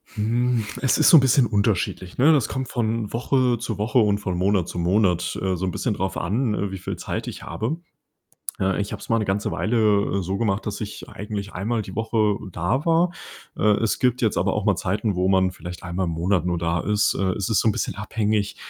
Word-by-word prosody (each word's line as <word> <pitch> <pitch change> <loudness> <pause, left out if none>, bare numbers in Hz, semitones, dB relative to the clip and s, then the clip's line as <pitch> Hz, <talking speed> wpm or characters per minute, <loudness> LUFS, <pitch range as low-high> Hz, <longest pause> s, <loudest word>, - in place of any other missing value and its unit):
Hm, 115 +2 0 0.2
es 130 - +2
ist - - +5
so 170 - +9
'n - - +9
bisschen 130 0 +4
unterschiedlich, 100 -4 -1
ne? 150 +5 +6
Das 135 -7 +2
kommt 130 -1 -3
von 115 -2 -2
Woche 125 0 +1
zu 115 -3 -4
Woche 110 +5 +2
und 105 -2 +3
von 95 -3 -3
Monat 95 -1 +1
zu - - -7
Monat, 90 0 +1
äh, 95 -1 0
so 95 - -3
'n 90 - -1
bisschen 120 - -1
darauf 95 -1 -3
an, 110 +6 0
äh, 100 -1 -2
wie 95 - -5
viel - - -4
Zeit - - -4
ich - - -7
habe. 130 +9 -3 0.8
Äh, 95 +1 +1
ich 100 - -3
habe - - -5
es - - -10
mal 115 - +3
'ne 110 - 0
ganze 100 +2 -1
Weile 105 -4 +1
so 95 +2 -2
gemacht, 105 -3 0
dass 105 +1 -4
ich 105 0 -7
eigentlich 100 -1 -6
einmal 110 +5 -2
die 95 -2 -9
Woche 110 -2 +1
da 95 - -1
war. 170 +2 +3 0.5
Äh, - - -2 0.2
es 115 - +1
gibt 125 -1 +1
jetzt 110 - +2
aber 95 +2 +1
auch 105 -1 -2
mal 100 -3 +3
Zeiten, 100 +2 -1
wo 90 +1 +1
man 95 -1 +3
vielleicht 90 -1 -9
einmal 90 +2 -2
im 85 - -2
Monat 90 +3 0
nur 85 -1 0
da 85 0 0
ist, 105 +3 +1
äh, 95 -1 0
es 100 - -2
ist 105 - +3
so - - +2
'n 105 - +3
bisschen - - -2
abhängig, 105 -1 -1
105 Hz, 235 wpm, -23 LUFS, 95-115 Hz, 0.8 s, so